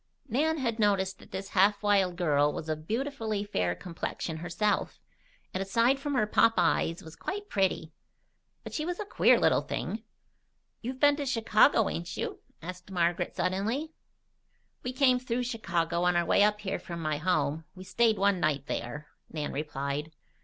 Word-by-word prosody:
Nan 310 +7 +1
had 235 -5 -1
noticed 195 -2 +1
that - - -15
this 195 +1 -6
half 200 +2 +3
wild 195 -3 +3
girl 150 -4 +2
was 155 - -6
of 155 0 -4
beautifully 225 -4 -2
fair 90 - -1
complexion 165 - -5
herself, 175 +5 -1 0.5
and 185 - -2
aside 230 +7 +2
from 285 0 -2
her 245 - +3
pop 225 +2 +4
eyes 165 -1 +1
was 160 0 -11
quite 410 - -5
petty. 190 -5 0 0.7
But - - -8
she 305 - -2
was 350 +2 -3
a 420 - -3
queer - - +4
little - - +3
thing. 220 - -4 0.8
"You've 255 +2 -5
been 290 0 +5
to 290 - -2
Chicago, 225 -1 +4
ain't 170 +1 -4
you?" - - -3 0.2
asked 180 +2 -8
Margaret 175 -1 0
suddenly. 220 +12 -1 0.9
"We 250 - -3
came 255 -1 +3
through 250 0 -2
Chicago 170 -8 -1
on 180 0 +3
our 175 0 +2
way 200 - +4
up 210 0 +2
here 195 - -2
from 170 -1 -7
my 155 -2 -1
home. 155 -2 0
We 185 - -9
stayed 220 +4 +2
one 200 -1 +2
night 145 -5 0
there," 145 +6 -4 0.2
Nan 150 -2 -4
replied. 145 +1 -3
195 Hz, 170 wpm, -29 LUFS, 165-230 Hz, 0.9 s, been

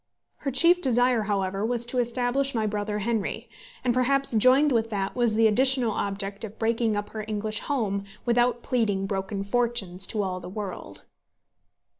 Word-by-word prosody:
Her 280 - -3
chief 340 +7 +5
desire, 245 -3 +2
however, 195 0 -1
was 235 +1 -1
to 250 +1 -2
establish 245 +3 0
my 220 -1 0
brother 210 0 -2
Henry; 215 -1 -2 0.4
and 245 - +2
perhaps 275 +2 +1
joined 255 +6 +4
with 225 -2 +1
that 200 -2 -3
was 240 -3 +2
the 225 +1 +4
additional 255 +2 +3
object 200 0 -4
of 220 0 -8
breaking 225 -1 0
up 205 - -4
her 215 -1 -5
English 215 0 -2
home 205 -8 -2 0.2
without 240 0 +1
pleading 210 -6 0
broken 195 0 -3
fortunes 200 -4 0
to 210 -2 -1
all 185 -1 -3
the 180 0 -9
world. 200 -1 -7
225 Hz, 165 wpm, -26 LUFS, 200-245 Hz, 0.4 s, chief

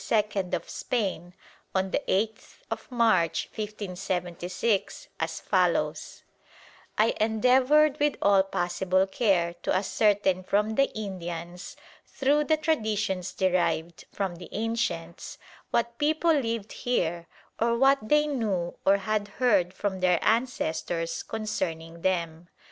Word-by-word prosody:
of 170 - -2
Spain 185 -7 -3 0.4
on 190 0 0
the - - 0
8th 215 +3 -3
March, 220 -10 +2
1576, 185 -1 -3
as - - -2
follows: - - 0 0.7
"I 215 +2 +3
endeavoured 255 +7 +4
with 295 -1 +2
all 200 -1 +5
possible 185 0 0
care 190 -4 +1
to - - -1
ascertain 195 -1 +2
from 210 +3 +1
the 275 +5 +3
Indians 175 -3 -6 0.3
through 290 +2 +1
the 315 0 +3
traditions 215 - -1
derived 170 -3 0
from 190 -4 -3
the 175 - -10
ancients, 215 -7 -3 0.3
what 235 0 -1
people 315 +3 +3
lived 230 -7 -1
here 175 -8 -1 0.3
or 235 +1 +2
what 270 +2 +5
they 295 +8 +3
knew 210 -12 -1
or 195 +1 +5
had 205 +1 -1
heard 200 -5 +2
from 190 -1 -3
their 180 -1 +3
ancestors 175 -8 0
concerning 170 -7 -4
them. 170 -2 -1
200 Hz, 115 wpm, -27 LUFS, 175-230 Hz, 0.7 s, all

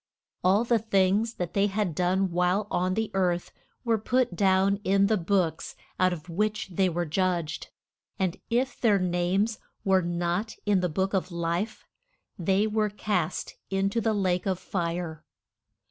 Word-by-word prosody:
All 195 +5 +4
the 235 -1 +2
things 210 +2 +2
that 175 -2 -4
they 200 0 +3
had 200 -3 -1
done 185 +3 +1
while 180 +4 +1
on 185 +1 +1
the 220 0 -1
earth 180 -2 0 0.3
were 230 -3 +1
put 245 -2 +1
down 195 +1 +3
in 195 0 +3
the 215 +2 +3
books 175 -3 0 0.2
out 185 0 +4
of 170 -1 -6
which 210 +4 -1
they 185 +1 +1
were 175 0 -1
judged. 170 -1 -1 0.5
And 190 -1 -1
if 245 +2 0
their 215 -4 +4
names 185 +4 0 0.3
were 190 -1 +4
not 175 +4 -2
in 205 -2 +3
the 180 -1 0
Book 190 +5 -1
of 190 -1 -1
Life 170 +5 -2 0.5
they 195 +2 +1
were 215 0 +1
cast 200 -5 -2 0.2
in 195 0 0
to 230 - 0
the 225 0 +1
lake 185 -2 0
of 190 -2 +1
fire. 170 -3 -3
190 Hz, 160 wpm, -27 LUFS, 175-210 Hz, 0.5 s, All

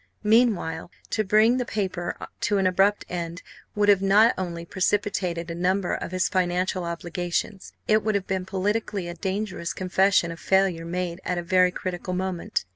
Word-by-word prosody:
Meanwhile, 210 -8 +2 0.2
to 215 - +1
bring 215 +4 +4
the 250 - 0
paper 190 -6 -3 0.2
to 205 - +1
an 195 - +1
abrupt 195 +3 +2
end 170 0 -5 0.3
would 205 0 +2
have 200 -2 +5
not 205 +4 +5
only 170 -2 -4
precipitated 185 -3 -1
a - - -3
number 180 +2 0
of - - -3
his 185 0 +1
financial 180 0 0
obligations; 175 +3 -3 0.2
it 215 0 +3
would 215 -1 0
have 195 -2 -1
been 190 -1 -3
politically, 200 -1 -1
a 175 - -5
dangerous 190 0 -3
confession 185 -1 +2
of 165 - -8
failure 190 -4 +1
made 175 +1 -3
at 180 - -2
a 175 - -2
very 185 +1 +4
critical 180 0 -4
moment. 185 - -2
185 Hz, 170 wpm, -25 LUFS, 175-200 Hz, 0.3 s, have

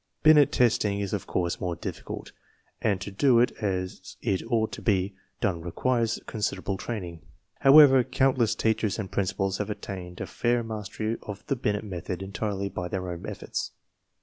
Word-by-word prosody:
Binet 150 -2 +7
testing 105 -4 +2
is 100 0 -3
of 100 - -3
course 85 -1 -1
more 90 -2 -1
difficult, - - -6 0.5
and 100 -4 +1
to 100 - -5
do 120 +5 +4
it 125 +1 +4
as 95 -3 -3
it 95 - +1
ought 115 -2 +1
to - - -7
be 95 -2 +1 0.3
done 95 -7 0
requires 115 +6 0
considerable 105 -2 -2
training. 90 -6 -5 0.4
However, 135 -2 +8
count 130 +1 +1
less 115 -2 +3
teachers 110 -2 +1
and 105 -4 -5
principals 95 0 -1
have 105 0 -2
attained 90 -4 -6
a - - -3
fair 120 0 0
mastery 110 0 -3
of 105 +1 -8
the 140 - 0
Binet 105 -4 -1
method 90 -2 -5
entirely 100 0 -2
by 90 -2 -4
their 90 0 -3
own 85 - -6
efforts. - - -4
105 Hz, 170 wpm, -27 LUFS, 95-115 Hz, 0.5 s, However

